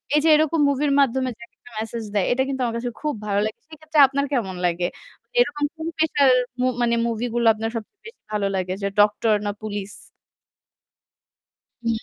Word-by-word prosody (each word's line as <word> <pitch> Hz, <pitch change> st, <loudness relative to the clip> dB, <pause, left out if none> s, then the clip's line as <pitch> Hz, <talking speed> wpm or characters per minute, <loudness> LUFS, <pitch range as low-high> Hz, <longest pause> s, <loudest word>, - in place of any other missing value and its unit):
এইযে 310 Hz, +2 st, +4 dB
এরকম 315 Hz, +1 st, +2 dB
মুভির 280 Hz, +1 st, +1 dB
মাধ্যমে 260 Hz, -1 st, +2 dB
যে -, -, -24 dB
একেকটা 230 Hz, +1 st, -20 dB
মেসেজ 225 Hz, +1 st, -4 dB
দেয়, 200 Hz, -3 st, +2 dB
এটা 260 Hz, +2 st, +2 dB
কিন্তু 270 Hz, -1 st, -3 dB
আমার 230 Hz, -, -2 dB
কাছে 245 Hz, +1 st, -3 dB
খুব 300 Hz, -1 st, -1 dB
ভালো 200 Hz, 0 st, +1 dB
লাগে। 215 Hz, -, -5 dB
সেক্ষেত্রে 310 Hz, -1 st, -2 dB
আপনার 280 Hz, +1 st, -1 dB
কেমন 200 Hz, -8 st, -1 dB
লাগে? 175 Hz, 0 st, 0 dB, 0.4 s
মানে -, -, -33 dB
এরকম 295 Hz, -12 st, +2 dB
কোন 320 Hz, +1 st, -5 dB
পেশার 290 Hz, -4 st, +4 dB, 0.3 s
মু 255 Hz, -, +2 dB, 0.2 s
মানে 235 Hz, 0 st, +2 dB
মুভিগুলো 235 Hz, +1 st, -1 dB
আপনার 225 Hz, +1 st, -4 dB
সবচেয়ে 230 Hz, -, -7 dB
বেশি 460 Hz, -, -14 dB
ভালো 205 Hz, -1 st, 0 dB
লাগে 185 Hz, -1 st, -1 dB
যে 200 Hz, -, +1 dB
ডক্টর 210 Hz, +1 st, +3 dB
না 205 Hz, -, 0 dB
পুলিশ? 205 Hz, -2 st, -5 dB, 1.9 s
হু। 230 Hz, -, -2 dB
240 Hz, 180 wpm, -23 LUFS, 215-290 Hz, 1.9 s, এইযে